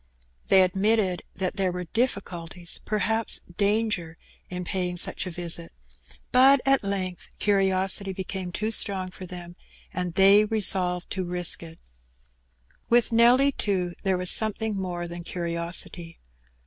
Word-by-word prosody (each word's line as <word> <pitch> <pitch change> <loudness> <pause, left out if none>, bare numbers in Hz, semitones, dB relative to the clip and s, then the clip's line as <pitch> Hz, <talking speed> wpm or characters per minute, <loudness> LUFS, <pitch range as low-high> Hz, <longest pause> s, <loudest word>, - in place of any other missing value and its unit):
They 190 -1 +6
admitted 190 0 +1
that 185 +1 -3
there 190 -2 0
were 180 0 -5
dif 230 +8 0
Bculties, 175 -2 -6
perhaps 220 +1 +1 0.2
danger, 200 -5 -1 0.3
in 180 0 -5
paying 180 -1 -3
such 180 - +1
a - - -3
visit; 170 -1 -2 0.6
but 265 +2 +6
at 270 -3 +3
length 190 -3 -4
curiosity 195 -1 +2
became 190 -1 -5
too 215 +5 -2
strong 190 -4 +4
for 185 0 -10
them, 175 0 -9 0.4
and 180 -2 -4
they 195 +2 +6
t^solved 190 -5 +1
to 185 - -3
risk 175 -1 -1
it. 165 -1 -11 1.1
With 235 -1 +3
Nelly, 245 +4 +5
too, 185 -8 -2
there 190 -2 0
was 180 0 +2
something 220 0 +1
more 175 -2 -4
than 170 0 -8
curiosity. 170 0 -4
185 Hz, 135 wpm, -25 LUFS, 175-210 Hz, 1.1 s, They